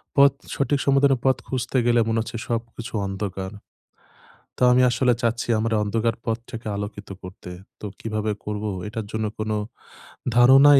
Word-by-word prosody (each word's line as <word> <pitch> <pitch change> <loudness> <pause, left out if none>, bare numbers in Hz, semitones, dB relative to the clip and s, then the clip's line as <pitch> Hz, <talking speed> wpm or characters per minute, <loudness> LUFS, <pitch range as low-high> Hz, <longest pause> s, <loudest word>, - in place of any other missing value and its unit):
পথ 140 0 +7 0.2
সঠিক 140 +1 +1
সমাধানের 140 -1 +4
পথ 130 -1 +4
খুঁজতে 130 0 -1
গেলে, 120 0 +4
মনে 115 0 +1
হচ্ছে 115 +1 -5
সবকিছু 115 +1 -4
অন্ধকার। 95 -1 -4 1.1
তো - - 0
আমি 125 +1 +5
আসলে 125 0 +3
চাচ্ছি 115 0 0
আমার 115 +1 0
অন্ধকার 115 +2 0
পথটাকে 115 0 -4
আলোকিত 100 0 -6
করতে। 90 -1 -9 0.3
তো - - -7
কিভাবে 110 -1 -2
করব, 105 0 -3 0.2
এটার 110 0 -4
জন্য 110 0 -1
কোন 110 0 -1 0.8
ধারণাই 135 +3 +8
115 Hz, 145 wpm, -24 LUFS, 110-130 Hz, 1.1 s, ধারণাই